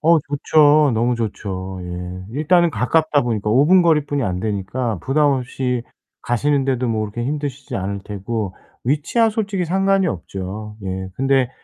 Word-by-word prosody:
어 165 Hz, +1 st, +5 dB
좋죠. 145 Hz, 0 st, +4 dB
너무 120 Hz, +2 st, +1 dB
좋죠. 95 Hz, -4 st, -4 dB
예. 90 Hz, +1 st, -6 dB
일단은 170 Hz, +5 st, +3 dB
가깝다 145 Hz, +4 st, +2 dB
보니까, 110 Hz, -3 st, -1 dB
5 135 Hz, +6 st, +4 dB
분 185 Hz, +1 st, +6 dB
거리뿐이 150 Hz, -4 st, +2 dB
안 90 Hz, -4 st, -1 dB
되니까 105 Hz, +2 st, -2 dB
부담 145 Hz, +2 st, +3 dB
없이 125 Hz, -1 st, -2 dB, 0.4 s
가시는데도 130 Hz, 0 st, +1 dB
뭐 110 Hz, -2 st, 0 dB
그렇게 110 Hz, +3 st, -3 dB
힘드시지 140 Hz, -1 st, -4 dB
않을 100 Hz, +1 st, -3 dB
테고 100 Hz, -1 st, -4 dB, 0.3 s
위치야 150 Hz, -, +2 dB
솔직히 200 Hz, -4 st, -1 dB
상관이 195 Hz, +2 st, +2 dB
없죠. 100 Hz, +4 st, -5 dB
예 95 Hz, 0 st, -4 dB
근데 135 Hz, +1 st, +2 dB
125 Hz, 315 characters per minute, -20 LUFS, 105-150 Hz, 0.4 s, 분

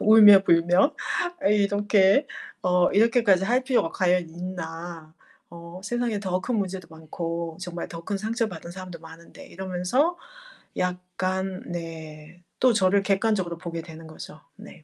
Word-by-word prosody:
울며불며 195 Hz, -, +6 dB, 0.5 s
아 -, -, +3 dB
이렇게 205 Hz, +3 st, +3 dB, 0.4 s
어 180 Hz, -1 st, +3 dB
이렇게까지 215 Hz, -3 st, +4 dB
할 245 Hz, +5 st, +2 dB
필요가 250 Hz, -11 st, +1 dB
과연 180 Hz, -3 st, +1 dB
있나? 170 Hz, -2 st, -7 dB, 0.4 s
어 170 Hz, +1 st, -10 dB
세상에 240 Hz, -1 st, -1 dB
더 185 Hz, -2 st, -1 dB
큰 245 Hz, +2 st, -1 dB
문제도 190 Hz, -3 st, -3 dB
많고 165 Hz, +1 st, -5 dB
정말 175 Hz, -2 st, -6 dB
더 165 Hz, -1 st, -8 dB
큰 205 Hz, -, -2 dB
상처받은 220 Hz, -3 st, -3 dB
사람도 180 Hz, -2 st, -9 dB
많은데.' 165 Hz, +1 st, -13 dB
이러면서 190 Hz, -, -1 dB, 0.6 s
약간 185 Hz, +1 st, -3 dB
네 165 Hz, -1 st, -8 dB, 0.2 s
또 255 Hz, -2 st, +4 dB
저를 195 Hz, -1 st, +3 dB
객관적으로 195 Hz, -3 st, 0 dB
보게 170 Hz, -1 st, -5 dB
되는 160 Hz, 0 st, -11 dB
거죠. 155 Hz, -1 st, -11 dB
네. 205 Hz, -6 st, -14 dB
185 Hz, 280 characters per minute, -25 LUFS, 170-205 Hz, 0.6 s, 울며불며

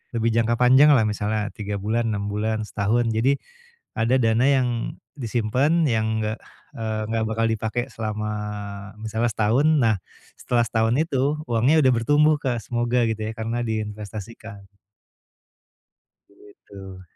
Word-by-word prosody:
lebih 115 Hz, 0 st, +1 dB
jangka 115 Hz, 0 st, +2 dB
panjang 130 Hz, +4 st, +6 dB
lah 115 Hz, -, +4 dB
misalnya 105 Hz, 0 st, -2 dB
3 105 Hz, -1 st, -4 dB
bulan, 115 Hz, +3 st, -1 dB
6 100 Hz, -1 st, -2 dB
bulan, 110 Hz, +1 st, -1 dB
setahun. 110 Hz, +4 st, 0 dB
Jadi 130 Hz, +5 st, +3 dB, 0.6 s
ada 115 Hz, +3 st, +2 dB
dana 115 Hz, 0 st, +2 dB
yang 135 Hz, -3 st, +3 dB, 0.5 s
disimpen 130 Hz, +6 st, +1 dB
yang 110 Hz, -2 st, 0 dB
nggak, 110 Hz, +1 st, -3 dB, 0.4 s
eee, 110 Hz, -1 st, -3 dB
nggak 115 Hz, -1 st, 0 dB
bakal 110 Hz, +1 st, 0 dB
dipakai 110 Hz, +2 st, -2 dB
selama 105 Hz, -1 st, -3 dB, 0.7 s
misalnya 110 Hz, +2 st, -1 dB
setahun. 110 Hz, +8 st, +2 dB
Nah 115 Hz, -4 st, +3 dB, 0.4 s
setelah 120 Hz, -1 st, +1 dB
setahun 115 Hz, +1 st, +1 dB
itu 140 Hz, -5 st, 0 dB, 0.2 s
uangnya 120 Hz, +7 st, +3 dB
udah 130 Hz, -, +5 dB
bertumbuh 145 Hz, +6 st, +3 dB
Kak. 125 Hz, -4 st, -1 dB
Semoga 120 Hz, +1 st, 0 dB
gitu 110 Hz, -1 st, -3 dB
ya 110 Hz, -, -3 dB
karena 115 Hz, +2 st, -2 dB
diinvestasikan. 110 Hz, -1 st, -6 dB, 1.6 s
Begitu. 100 Hz, -2 st, -13 dB
115 Hz, 135 wpm, -23 LUFS, 110-120 Hz, 1.6 s, panjang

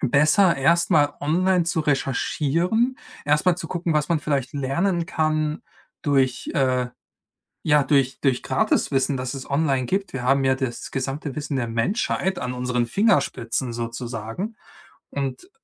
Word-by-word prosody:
besser 155 Hz, -, +4 dB
erst 170 Hz, +6 st, +3 dB
mal 145 Hz, -3 st, +3 dB
online 180 Hz, +4 st, +2 dB
zu 165 Hz, -1 st, 0 dB
recherchieren, 160 Hz, -, 0 dB, 0.3 s
erst 150 Hz, +4 st, +2 dB
mal 180 Hz, -1 st, +4 dB
zu 165 Hz, -3 st, -6 dB
gucken, 170 Hz, -2 st, -1 dB
was 150 Hz, -1 st, +1 dB
man 165 Hz, -, +3 dB
vielleicht 140 Hz, -4 st, -1 dB
lernen 170 Hz, +6 st, 0 dB
kann 155 Hz, -1 st, 0 dB, 0.4 s
durch 135 Hz, -4 st, +1 dB
äh, 130 Hz, -2 st, +1 dB, 0.8 s
ja, 150 Hz, -1 st, +4 dB
durch 135 Hz, -2 st, +1 dB
durch 130 Hz, -3 st, +1 dB
Gratiswissen, 135 Hz, +1 st, +1 dB
das 125 Hz, +1 st, -4 dB
es 135 Hz, -, -7 dB
online 140 Hz, -3 st, +1 dB
gibt. 195 Hz, +1 st, -1 dB
Wir 130 Hz, -, -3 dB
haben 135 Hz, +1 st, +3 dB
ja 130 Hz, 0 st, +3 dB
das 130 Hz, -3 st, -4 dB
gesamte 135 Hz, +1 st, -3 dB
Wissen 145 Hz, -2 st, -3 dB
der 120 Hz, -3 st, -1 dB
Menschheit 190 Hz, -, 0 dB
an 125 Hz, 0 st, -3 dB
unseren 125 Hz, -1 st, -1 dB
Fingerspitzen 130 Hz, -, +1 dB
sozusagen 115 Hz, -, -5 dB, 0.5 s
und 140 Hz, -, -4 dB
145 Hz, 145 wpm, -23 LUFS, 130-170 Hz, 0.8 s, besser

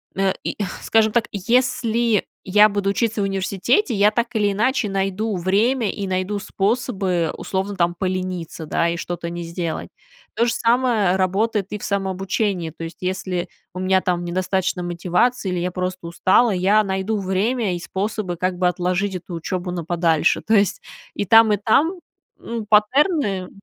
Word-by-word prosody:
э, 195 Hz, -1 st, +1 dB
и, -, -, -3 dB, 0.2 s
скажем 220 Hz, -1 st, +3 dB
так, 235 Hz, -2 st, +2 dB
если 230 Hz, 0 st, +1 dB, 0.2 s
я 210 Hz, +3 st, +6 dB
буду 200 Hz, -1 st, -1 dB
учиться 220 Hz, 0 st, 0 dB
в -, -, +1 dB
университете, 195 Hz, -, 0 dB
я 205 Hz, 0 st, +4 dB
так 235 Hz, +2 st, 0 dB
или 205 Hz, -2 st, +2 dB
иначе 230 Hz, +2 st, +1 dB
найду 195 Hz, +2 st, -1 dB
время 210 Hz, +6 st, +1 dB
и 200 Hz, -2 st, -5 dB
найду 185 Hz, +2 st, -1 dB
способы 195 Hz, -5 st, -1 dB
условно 195 Hz, +1 st, -3 dB
там 175 Hz, -2 st, +1 dB
полениться, 185 Hz, -3 st, -3 dB
да, 170 Hz, +2 st, +1 dB
и 170 Hz, -, -2 dB
что-то 170 Hz, 0 st, -4 dB
не 175 Hz, 0 st, -5 dB
сделать. 170 Hz, -1 st, -4 dB, 0.5 s
То 235 Hz, -, +2 dB
же 235 Hz, -, 0 dB
самое 230 Hz, -6 st, +2 dB
работает 195 Hz, +2 st, 0 dB
и -, -, -2 dB
в -, -, -12 dB
самообучении. 195 Hz, -2 st, -1 dB
То 165 Hz, +1 st, -7 dB
есть, 165 Hz, -, -9 dB
если 185 Hz, -1 st, -2 dB, 0.2 s
у 185 Hz, -, -6 dB
меня 190 Hz, 0 st, +3 dB
там 175 Hz, -1 st, -1 dB
недостаточно 185 Hz, +1 st, -1 dB
мотивации 180 Hz, +6 st, 0 dB
или 180 Hz, -1 st, -1 dB
я 180 Hz, +1 st, -1 dB
просто 180 Hz, -1 st, -4 dB
устала, 185 Hz, +7 st, +3 dB
я 195 Hz, +3 st, +3 dB
найду 195 Hz, +2 st, -1 dB
время 195 Hz, +2 st, 0 dB
и -, -, -5 dB
способы 190 Hz, 0 st, -3 dB
как 185 Hz, +1 st, -1 dB
бы 180 Hz, 0 st, +2 dB
отложить 180 Hz, +2 st, -1 dB
эту 180 Hz, 0 st, -7 dB
учебу 180 Hz, +2 st, -4 dB
на 175 Hz, -1 st, -4 dB
подальше. 165 Hz, -2 st, +2 dB
То 220 Hz, -, +1 dB
есть 200 Hz, -3 st, +2 dB, 0.3 s
и 205 Hz, -, -2 dB
там, 225 Hz, +2 st, +6 dB
и -, -, +2 dB
там, 250 Hz, -, +3 dB, 0.5 s
ну, 230 Hz, -2 st, -5 dB
паттерны 210 Hz, -, +2 dB
195 Hz, 170 wpm, -21 LUFS, 180-215 Hz, 0.5 s, я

